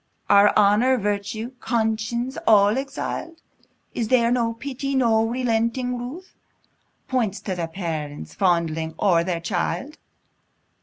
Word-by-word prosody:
Are 200 +1 +7
honour, 215 +6 +4
virtue, 210 +2 -3
conscience, 235 +2 -1
all 210 -1 +5
exil'd? 280 +4 -4 0.5
Is 230 - -2
there 235 -1 +3
no 235 -2 +1
pity, 275 +2 -4
no 230 -4 +3
relenting 245 +1 0
ruth, 260 +10 -8 0.7
Points 220 -6 -1
to 190 - -3
the 170 -2 -3
parents 160 -4 -5
fondling 165 -4 0
o'er 170 -4 +3
their 175 -1 -2
child? 195 - -3
225 Hz, 115 wpm, -23 LUFS, 195-250 Hz, 0.7 s, Are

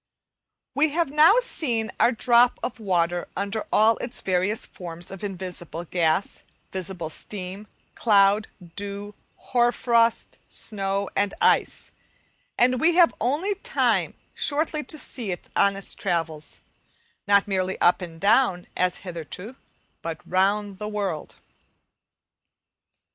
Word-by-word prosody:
We 305 +2 +3
have 325 -1 0
now 310 +7 +6
seen 235 - -1
our 240 - +5
drop 240 +1 +4
of 245 - -4
water 175 -4 0
under 200 +2 -3
all 220 +1 +4
its 240 - -5
various 190 +3 0
forms 175 -1 -9
of 195 +1 -9
invisible 180 -4 -5
gas, 170 +1 0 0.3
visible 180 -3 -3
steam, 195 +3 -5 0.3
cloud, 205 -1 +4 0.3
dew, 205 0 -4 0.2
hoar 240 -1 +1
frost, 235 -2 +1
snow, 200 -1 -1
and 200 0 0
ice, - - +2 0.7
and 250 +1 +3
we 330 +1 +4
have 345 -2 +6
only 300 - +1
time 460 +5 0 0.2
shortly 305 +1 0
to 310 - -3
see 235 -8 -3
it 175 - -7
on 200 0 +3
its 195 - -3
travels, 165 -5 -3 0.7
not 200 0 +4
merely 190 -1 -1
up 175 - +4
and 165 -2 -8
down, 200 -3 +3
as 180 -1 +1
hitherto, 180 - -7 0.5
but 165 -1 -5
round 200 +2 +1
the 210 - -4
world. 200 -7 -3
200 Hz, 125 wpm, -25 LUFS, 180-240 Hz, 0.7 s, now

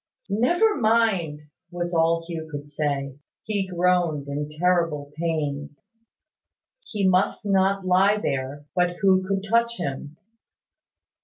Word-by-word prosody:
"Never 350 - +3
mind!" 215 - +1 0.3
was 175 0 -4
all 165 0 +2
Hugh 165 -2 -6
could 145 -1 -7
say. 140 -2 -2 0.2
He 205 -3 -1
groaned 175 -5 +1
in 145 +1 -3
terrible 160 -3 0
pain. 150 -3 -2 1.1
He 205 - -1
must 185 +3 +1
not 195 -1 +2
lie 190 +3 +4
there; 140 -5 -3
but 180 0 +1
who 190 -1 +4
could 195 0 -1
touch 235 +2 +2
him? 145 -1 -5
175 Hz, 120 wpm, -24 LUFS, 150-195 Hz, 1.1 s, lie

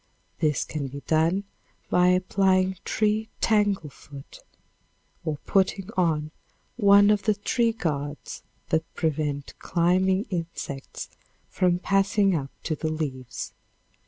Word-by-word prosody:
This 150 -4 +1
can 145 -3 -4
be 140 +2 -8
done 165 +6 +2 0.5
by 180 0 +5
applying 185 +1 +2
tree 215 +1 0
tanglefoot, 190 -10 -1 0.8
or 155 -3 -2
putting 195 0 +1
on 155 -5 +1 0.4
one 205 -2 +6
of 210 -1 +2
the 215 0 +2
tree 230 +3 +1
guards 150 -8 -4 0.3
that 160 0 0
prevent 150 -3 -2
climbing 185 +3 +2
insects 165 -5 -5 0.4
from 180 -1 +2
passing 195 +1 +2
up 135 -4 -2
to 155 - -1
the 155 +1 -2
leaves. 135 -6 -4
180 Hz, 110 wpm, -26 LUFS, 155-195 Hz, 0.8 s, one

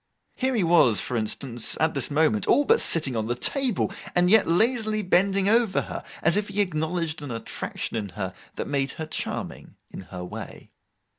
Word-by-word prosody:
Here 260 0 0
he 215 - +2
was, 165 -10 +4
for 125 - -2
instance, 115 +2 -3
at 160 0 +2
this 140 -3 0
moment, 145 -9 +1
all 290 - +4
but 455 +1 +4
sitting 150 -6 +3
on 110 -1 -2
the 120 - -1
table, 255 - 0 0.2
and 180 +1 +3
yet 220 -1 +5
lazily 215 +4 +1
bending 195 +1 +2
over 225 -2 +3
her, - - -7 0.2
as - - +4
if 210 0 0
he 205 0 -4
acknowledged 165 -3 -1
an 145 - -7
attraction 115 0 -4
in 105 -3 -3
her 95 -2 -3 0.2
that - - -4
made 140 -2 -1
her 160 - -5
charming—in 155 - -6
her 90 -1 -8
way. - - -9
165 Hz, 180 wpm, -25 LUFS, 125-205 Hz, 0.2 s, yet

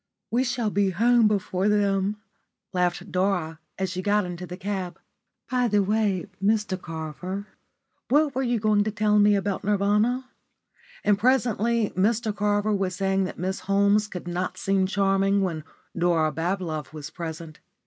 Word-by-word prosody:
"We 245 +2 +2
shall 245 -4 -1
be 200 -1 +2
home 230 +4 +4
before 195 -1 0
them," 200 0 +1 0.6
laughed 180 +1 -1
Dora 180 -4 0 0.2
as 190 -1 -2
she 185 0 -3
got 205 +1 +2
into 180 0 -6
the 180 +1 -7
cab. 185 -3 -4 0.5
"By 250 -1 +2
the 205 -2 +2
way, 205 -2 0 0.2
Mr 205 -3 +1
Carver, 165 +5 -5 0.6
what 295 +1 +3
were 260 - -1
you 240 -3 0
going 210 -1 +3
to - - 0
tell 210 0 +2
me 205 0 +5
about 200 0 -2
Nirvana?" 210 +5 +1 0.8
And 205 -1 +3
presently 235 -2 +2
Mr 215 +3 0
Carver 205 +1 +1
was 190 -2 -1
saying 195 0 +1
why - - -5
Miss 190 +2 -2
Holmes 200 +2 +2
could 180 -3 -8
not 180 +1 -3
seem 195 -1 +1
charming 195 0 +2
when 165 -5 -2 0.3
Dora 170 -3 +2
Bablove 165 -3 -3
was 150 -1 -7
present. 165 -2 -7
200 Hz, 155 wpm, -25 LUFS, 185-210 Hz, 0.8 s, me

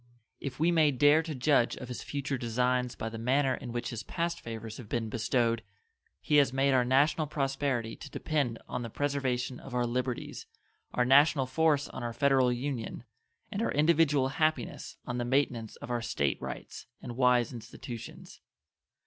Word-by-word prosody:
If 140 -1 -6
we 165 +3 +3
may 160 -3 +5
dare 145 +3 +5
to 160 -2 -5
judge 130 -2 +2
of - - -7
His 125 - -6
future 140 -1 -3
designs 125 +1 0
by 115 - -4
the 115 0 -6
manner 130 +3 +2
in 120 -1 -6
which 120 0 -3
His 115 -2 -4
past 170 0 -2
favors 115 -1 -7
have 115 -5 -10
been 115 -2 -1
bestowed, 115 0 +1 0.6
He 150 - +2
has 140 -2 +5
made 135 +1 +2
our 130 -1 +4
national 145 +5 +3
prosperity 135 -5 -1
to - - -9
depend 140 -7 -1
on 125 - -3
the 115 - -5
preservation 130 -2 -1
of 130 - -8
our 125 -1 +2
liberties, 125 +1 -3 0.4
our 125 - +1
national 135 +1 +5
force 150 +1 +2
on - - -7
our 120 -1 -3
Federal 130 0 +3
Union, 120 -2 -3 0.5
and 205 0 -2
our - - 0
individual 150 -3 +3
happiness 155 -2 -1
on 125 0 -3
the - - 0
maintenance 120 -3 0
of - - -8
our 120 -1 0
State 70 - -1
rights - - -7
and 120 -2 -7
wise 125 -1 +3
institutions. 115 0 -9
130 Hz, 175 wpm, -30 LUFS, 120-145 Hz, 0.6 s, may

